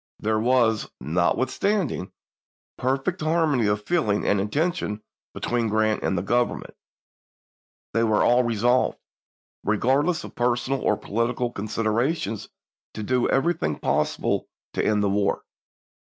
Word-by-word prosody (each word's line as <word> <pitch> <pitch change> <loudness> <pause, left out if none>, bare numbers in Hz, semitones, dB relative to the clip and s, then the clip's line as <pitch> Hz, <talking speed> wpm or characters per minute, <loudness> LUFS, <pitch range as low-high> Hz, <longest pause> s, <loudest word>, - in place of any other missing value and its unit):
There 110 0 0
was, 115 -2 +2
notwithstanding, 125 - 0 0.6
perfect 135 +8 -1
harmony 155 -7 +2
of 105 0 -1
feeling 130 -13 +1
and 100 -1 +2
intention 110 - -1 0.3
between 120 -1 -1
Grant 110 0 +1
and 95 - 0
the 85 - -1
Government. 120 +4 0 1.2
They 115 - +2
were 110 -2 +3
all 120 +1 +5
resolved, 120 +2 +2 0.7
regardless 135 - +1
of - - -9
personal 125 +2 0
or 105 - +2
political 120 +2 -1
considerations, 110 - -1 0.5
to 110 - -4
do 125 +3 +1
everything 135 - +1
possible - - 0 0.3
to - - 0
end 105 -1 +2
the - - +2
war. 100 0 0
115 Hz, 120 wpm, -24 LUFS, 105-130 Hz, 1.2 s, all